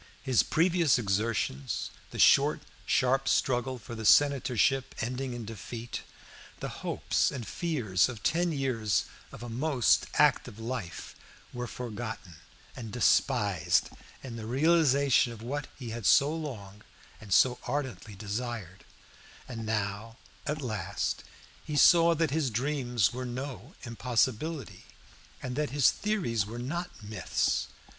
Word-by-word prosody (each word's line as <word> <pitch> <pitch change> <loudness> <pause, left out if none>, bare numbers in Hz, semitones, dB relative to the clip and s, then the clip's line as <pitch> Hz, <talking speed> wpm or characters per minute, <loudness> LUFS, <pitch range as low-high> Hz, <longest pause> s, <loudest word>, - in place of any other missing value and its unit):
His 130 -4 +4
previous 170 -2 +3
exertions, 100 - -1 0.2
the - - -9
short - - +5 0.3
sharp 135 +1 +2
struggle 130 0 +1
for 120 +1 -10
the 110 -1 -6
senatorship 135 0 +3
ending 125 +2 -3
in 120 -2 -6
defeat, 115 +2 -6 0.6
the - - -4
hopes - - 0
and 120 -6 -6
fears 125 - 0
of 110 -5 -8
ten 170 +7 +1
years 125 -8 0 0.3
of - - -10
a - - -6
most 125 +1 +2
active 105 - +3
life, 115 -6 -6 0.4
were 125 0 -4
forgotten 110 -8 -6 0.4
and 115 -3 -7
despised 105 - +2 0.3
in 120 -3 -7
the 110 -1 -6
realization 140 -3 +3
of 110 -1 -11
what 140 +3 -3
he 120 -4 -7
had 115 -3 -2
so 145 +2 +5
long 105 -11 -7 0.4
and 105 -3 -12
so 125 +5 +4
ardently 125 -6 -4
desired, 105 -2 -5 0.6
and 115 -3 -6
now 105 +1 -3 0.3
at 150 0 -2
last 100 -5 -3 0.4
he 150 - -5
saw 170 +2 +6
that 160 -2 0
his 150 -3 +1
dreams 125 -3 0
were 130 +1 -4
no 125 - -6
impossibility, 120 - -1 0.6
and 125 -1 -4
that 150 -1 0
his 140 -1 +4
theories 180 - -1
were 115 +2 -7
not 170 +9 -3
myths. 105 +1 -1
125 Hz, 130 wpm, -29 LUFS, 110-140 Hz, 0.6 s, saw